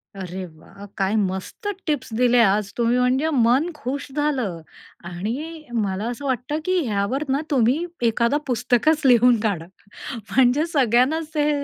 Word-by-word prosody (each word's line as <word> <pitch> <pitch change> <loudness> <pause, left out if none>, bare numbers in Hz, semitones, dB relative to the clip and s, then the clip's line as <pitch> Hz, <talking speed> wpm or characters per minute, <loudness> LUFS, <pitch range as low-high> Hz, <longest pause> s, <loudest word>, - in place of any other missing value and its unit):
अरे 185 -1 -6
वाह! 180 +5 -14
काय 195 +1 0
मस्त 190 - -3 0.2
टिप्स 295 -6 -2
दिल्या 245 -2 +5
आज 200 0 -1
तुम्ही 235 +1 +2
म्हणजे 260 +5 +2
मन 255 +5 +3
खुश 280 -1 -4
झालं 260 - -1 0.5
आणि 265 - -5
मला 205 -3 -1
असं 245 +4 -6
वाटतं 265 +3 -2
की 370 0 +2
ह्यावर 210 +8 -1
ना 275 +2 +1
तुम्ही 265 +6 +2 0.2
एखादा 235 +5 +1
पुस्तकच 250 +6 +2
लिहून 245 -2 +5
काढा 190 -7 -1 0.5
म्हणजे 250 +6 +2
सगळ्यांनाच 280 +1 +2
ते 295 0 +2
245 Hz, 140 wpm, -22 LUFS, 210-285 Hz, 0.5 s, दिल्या